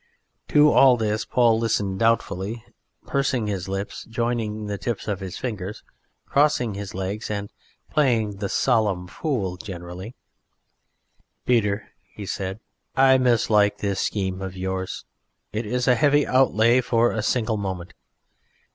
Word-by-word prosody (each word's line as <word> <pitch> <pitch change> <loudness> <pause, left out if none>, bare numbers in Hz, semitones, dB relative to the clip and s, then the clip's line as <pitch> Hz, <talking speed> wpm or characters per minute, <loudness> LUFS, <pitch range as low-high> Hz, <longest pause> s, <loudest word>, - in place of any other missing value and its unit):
To 150 0 +5
all 130 -2 +6
this 110 -1 -1
Paul 115 -3 +3
listened 105 -4 0
doubtfully, 115 -1 0 0.4
pursing 135 -3 0
up 105 - -2
his 95 -3 -3
lips, 95 +1 -4
joining 115 -2 -2
the 100 -1 -4
tips 120 -3 -3
of 100 -3 -2
his 95 -3 -6
fingers, 105 -5 -5 0.4
crossing 140 -6 +2
his 100 -1 -6
legs 95 +3 -4
and 100 -1 -4 0.4
playing 115 -8 +1
the 100 -1 -3
solemn 105 -8 +1
fool 95 - -3
generally. 90 +2 -8 1.3
"Peter," 105 -4 +1 0.4
said 95 +1 -4 0.4
he, - - -4
"I 130 0 +6
mislike 110 -4 +3
this 100 -2 -2
scheme 95 -2 -2
of 95 -1 -6
yours. 95 0 -4 0.5
It 110 +1 -3
is 125 +3 -1
a 125 - +6
heavy 145 +4 +3
outlay 125 -2 +4
for 120 -1 +2
a 110 - -2
single 110 0 0
moment. 95 -3 -5
110 Hz, 140 wpm, -24 LUFS, 95-120 Hz, 1.3 s, all